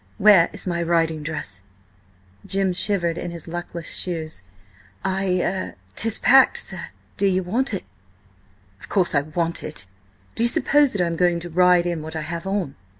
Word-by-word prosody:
"Where 195 -5 +6
is - - -4
my 170 -2 -1
riding 165 -2 +1
dress?" 150 - -4 0.8
Jim 195 -1 0
shivered 175 -3 0
in - - -4
his 170 -1 -8
luckless 170 -1 -5
shoes. 160 - -3 0.6
"I–er–'tis 185 - -1
packed, 265 +1 +5
sir. - - -4 0.3
Do 200 - +2
ye 185 -1 +2
want 230 +9 -1
it?" 195 - -3 1.0
"Of - - -12
course 185 -4 +2
I 145 - +3
want 165 +3 -2
it! 150 -9 -5 0.5
Do - - -2
you 235 - +6
suppose 290 +3 +3
that 200 - 0
I - - +3
am 170 -1 -2
going 175 -1 +2
to 175 0 -7
ride 180 0 +4
in 170 -2 -2
what 160 +1 -7
I 160 - -2
have 170 +4 -5
on?" 190 -8 -2
175 Hz, 170 wpm, -22 LUFS, 165-195 Hz, 1.0 s, Where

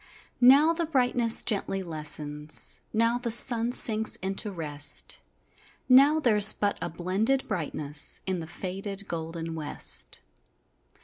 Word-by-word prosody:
Now 280 +6 +5
the 335 -1 -4
brightness 245 -5 +2
gently 195 -2 -2
lessens, 150 -2 -3
Now 230 +2 0
the 245 - -5
sun 235 0 +5
sinks 220 -3 +1
into 195 +3 -4
rest, 150 -4 -2 0.7
Now 275 +4 +4
there's 215 -7 +6
but 205 -1 -3
a - - -4
blended 195 +11 -2
brightness 150 -3 -3
In 185 -2 -3
the 160 - -8
faded 195 +3 -7
golden 165 0 -6
west. 145 - -1
195 Hz, 120 wpm, -26 LUFS, 160-240 Hz, 0.7 s, there's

